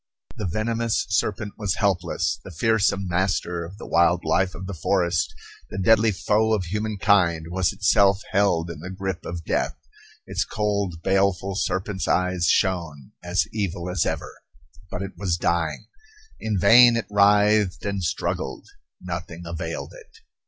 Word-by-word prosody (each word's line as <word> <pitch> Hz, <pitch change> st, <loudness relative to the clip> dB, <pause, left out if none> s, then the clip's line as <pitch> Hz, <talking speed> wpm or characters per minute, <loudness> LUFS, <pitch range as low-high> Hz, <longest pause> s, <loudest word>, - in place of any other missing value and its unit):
The 105 Hz, -, -3 dB
venomous 115 Hz, +4 st, -1 dB
serpent 105 Hz, 0 st, -1 dB
was 100 Hz, -4 st, 0 dB
helpless; 95 Hz, -5 st, 0 dB
the -, -, -9 dB
fearsome 100 Hz, +1 st, +1 dB
master 90 Hz, -1 st, -1 dB
of 90 Hz, +4 st, -10 dB
the -, -, -9 dB
wild 85 Hz, +1 st, +2 dB
life 90 Hz, +4 st, +1 dB
of 95 Hz, -, -7 dB
the 100 Hz, -, -5 dB
forest, 85 Hz, +1 st, 0 dB, 0.4 s
the -, -, -7 dB
deadly 110 Hz, +3 st, +4 dB
foe 105 Hz, +3 st, +1 dB
of 100 Hz, -, -2 dB
humankind, 100 Hz, -4 st, +1 dB
was 95 Hz, 0 st, +1 dB
itself 100 Hz, 0 st, +3 dB
held 85 Hz, -4 st, +1 dB
in 80 Hz, -, -9 dB
the 90 Hz, +4 st, -7 dB
grip 95 Hz, -1 st, -4 dB
of 85 Hz, -1 st, -6 dB
death. -, -, -1 dB, 0.5 s
Its -, -, -1 dB
cold, 100 Hz, -5 st, -2 dB
baleful 95 Hz, 0 st, +1 dB
serpent's 95 Hz, 0 st, -2 dB
eyes 90 Hz, -1 st, +1 dB
shone, 85 Hz, -8 st, 0 dB
as 90 Hz, +1 st, +1 dB
evil 90 Hz, -4 st, -3 dB
as 90 Hz, -3 st, +1 dB
ever. -, -, -4 dB, 0.5 s
But 90 Hz, -, -4 dB
it 100 Hz, -, -6 dB
was 90 Hz, -4 st, 0 dB
dying. 85 Hz, -2 st, -1 dB, 0.5 s
In 110 Hz, -2 st, -1 dB
vain 115 Hz, +5 st, +7 dB
it 115 Hz, -, -2 dB
writhed 105 Hz, -1 st, +3 dB
and 100 Hz, -2 st, -2 dB
struggled. 80 Hz, -, -3 dB, 0.3 s
Nothing 85 Hz, -1 st, -6 dB
availed 85 Hz, 0 st, -5 dB
it. -, -, -16 dB
95 Hz, 150 wpm, -24 LUFS, 85-100 Hz, 0.5 s, vain